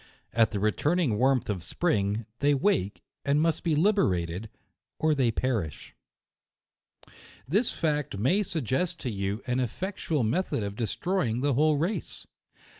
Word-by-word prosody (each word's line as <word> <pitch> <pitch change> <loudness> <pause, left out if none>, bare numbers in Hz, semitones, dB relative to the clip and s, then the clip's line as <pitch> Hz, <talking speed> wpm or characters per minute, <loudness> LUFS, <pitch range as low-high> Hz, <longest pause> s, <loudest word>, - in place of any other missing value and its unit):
At 115 -1 +4
the 105 - -3
returning 125 - +1
warmth 130 0 +3
of 95 -5 -3
spring, 105 - 0
they 145 0 +3
wake, 100 - 0 0.2
and 145 +1 +2
must 160 0 +1
be 165 -3 +2
liberated, 105 - +1 0.5
or 155 0 +2
they 135 -5 +2
perish. 110 - -2 1.5
This 205 - +2
fact 150 -9 -1
may 150 - +2
suggest 165 - -1
to 125 - -2
you 100 +2 -3
an 125 0 0
effectual 155 - -2
me 115 +10 +2
thod 120 - -3
of 100 0 -4
destroying 115 - -1
the 145 0 +2
whole 150 +3 +3
race. 170 +9 -2
130 Hz, 140 wpm, -28 LUFS, 105-160 Hz, 1.5 s, At